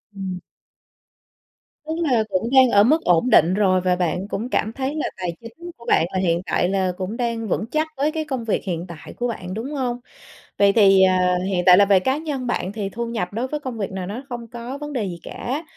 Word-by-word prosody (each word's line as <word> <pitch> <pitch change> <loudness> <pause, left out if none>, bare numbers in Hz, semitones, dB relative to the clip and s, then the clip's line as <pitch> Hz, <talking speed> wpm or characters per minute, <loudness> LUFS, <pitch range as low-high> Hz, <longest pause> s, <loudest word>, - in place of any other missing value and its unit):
Ừm. 185 -2 -5 1.5
Tức 315 - -3
là 245 -7 +2
cũng 195 +4 -1
đang 260 -1 +7
ở 205 -2 +5
mức 305 +8 +3
ổn 180 +8 +3
định 170 -3 +5
rồi, 190 -2 +2
và 180 0 +2
bạn 180 +2 -1
cũng 220 +4 -4
cảm 220 -3 -1
thấy 275 +2 -3
là 305 - -2
tài 180 -2 -3
chính 330 +10 -10
của 235 - -15
bạn 160 - +4
là 190 - 0
hiện 170 -2 +1
tại 175 - +1
là 190 -1 +1
cũng 195 +5 -4
đang 230 -2 -2
vững 215 - -1
chắc 310 +1 +1
với 290 +3 +1
cái 315 -1 -3
công 265 -6 -3
việc 215 - -1
hiện 175 -2 -3
tại 170 -3 -10
của 245 - -1
bạn, 185 -6 -5
đúng 230 +7 -5
hông? 250 -3 -2 0.6
Vậy 200 0 +5
thì, 195 -3 +6
à, 180 -1 +3
hiện 185 -2 0
tại 180 -1 +8
là 200 - +6
về 195 -1 +5
cá 260 +9 0
nhân 290 -5 -4
bạn 200 -4 -2
thì 205 -3 -3
thu 235 +4 -4
nhập 220 -6 -3
đối 235 +4 -2
với 300 +2 -3
công 260 -5 -6
việc 200 -3 -3
này 190 -1 -5
nó 230 +8 -6
không 240 -1 -6
có 240 +3 -7
vấn 295 0 -7
đề 235 -5 -1
gì 175 -3 -6
cả. 275 +6 -4
220 Hz, 240 wpm, -22 LUFS, 185-255 Hz, 1.5 s, tại